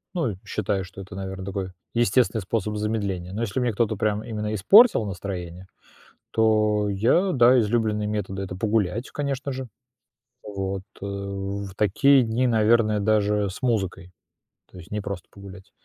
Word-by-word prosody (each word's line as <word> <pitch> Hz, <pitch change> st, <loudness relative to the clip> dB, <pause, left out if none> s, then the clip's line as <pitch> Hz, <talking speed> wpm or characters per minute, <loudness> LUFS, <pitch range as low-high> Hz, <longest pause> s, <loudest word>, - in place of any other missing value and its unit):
Ну, 160 Hz, -11 st, 0 dB
и -, -, -7 dB
считаю, 100 Hz, -2 st, -2 dB
что 95 Hz, +1 st, -10 dB
это, 95 Hz, 0 st, -10 dB
наверное, 95 Hz, -1 st, -6 dB
такой 95 Hz, -1 st, -4 dB, 0.2 s
естественный 115 Hz, -1 st, +2 dB
способ 105 Hz, +2 st, -2 dB
замедления, 100 Hz, -4 st, -2 dB
но 110 Hz, -, -3 dB
если 115 Hz, +2 st, -2 dB
мне 120 Hz, -2 st, +1 dB
кто-то 110 Hz, 0 st, 0 dB
прям 105 Hz, +1 st, -1 dB
именно 105 Hz, -1 st, -4 dB
испортил 115 Hz, -, +6 dB
настроение, 95 Hz, -2 st, -6 dB, 0.6 s
то 105 Hz, -2 st, +2 dB
я 120 Hz, -, +2 dB
да 125 Hz, -1 st, +6 dB
излюбленные 105 Hz, -1 st, 0 dB
методы 100 Hz, -2 st, -3 dB
это 90 Hz, -1 st, -6 dB
погулять, 110 Hz, +2 st, -1 dB
конечно 140 Hz, -1 st, -3 dB
же. 130 Hz, -1 st, -5 dB, 0.8 s
Вот, 95 Hz, -2 st, -4 dB, 0.2 s
э -, -, -4 dB
в 100 Hz, 0 st, -5 dB
такие 130 Hz, +7 st, +4 dB
дни, 120 Hz, +2 st, 0 dB
наверное, 110 Hz, -2 st, +3 dB
даже 105 Hz, -1 st, +2 dB
с 95 Hz, -, -10 dB
музыкой, 95 Hz, -7 st, -1 dB, 0.6 s
то -, -, -13 dB
есть 85 Hz, +2 st, -13 dB
не 105 Hz, 0 st, -2 dB
просто 100 Hz, -3 st, -6 dB
погулять. 100 Hz, 0 st, -12 dB
105 Hz, 155 wpm, -24 LUFS, 95-115 Hz, 0.8 s, испортил